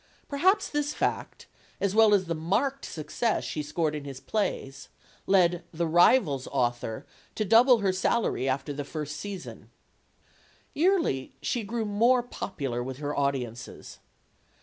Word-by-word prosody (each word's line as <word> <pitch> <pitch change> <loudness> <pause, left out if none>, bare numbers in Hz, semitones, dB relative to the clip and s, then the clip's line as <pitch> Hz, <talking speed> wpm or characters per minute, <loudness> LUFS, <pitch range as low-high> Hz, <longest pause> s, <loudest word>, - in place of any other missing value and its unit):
Perhaps 375 +9 +2
this 295 0 -2
fact, - - -2 0.3
as 200 -1 0
well 220 -1 +6
as 190 -2 +1
the 170 - -2
marked 210 - -1
success 170 +9 -2
she 155 - -3
scored 150 +1 -1
in 150 -1 -5
his 135 -2 -8
plays, 135 -5 -3 0.4
led 180 -3 +3
"The 170 +1 -1
Rivals* 165 - +4
" - - -10
author 120 -2 -1 0.3
to 215 - -1
double 235 +4 +6
her 195 -2 +1
salary 185 - 0
after 135 +2 -2
the 145 +1 -4
first 150 0 -5
season. 200 -3 -8 1.0
Yearly 330 - +1
she 240 - -1
grew 225 +2 -3
more 235 +5 +3
popular 140 - -4
with 130 +1 -5
her 145 0 -4
audiences. 130 -4 -3
175 Hz, 145 wpm, -27 LUFS, 140-225 Hz, 1.0 s, well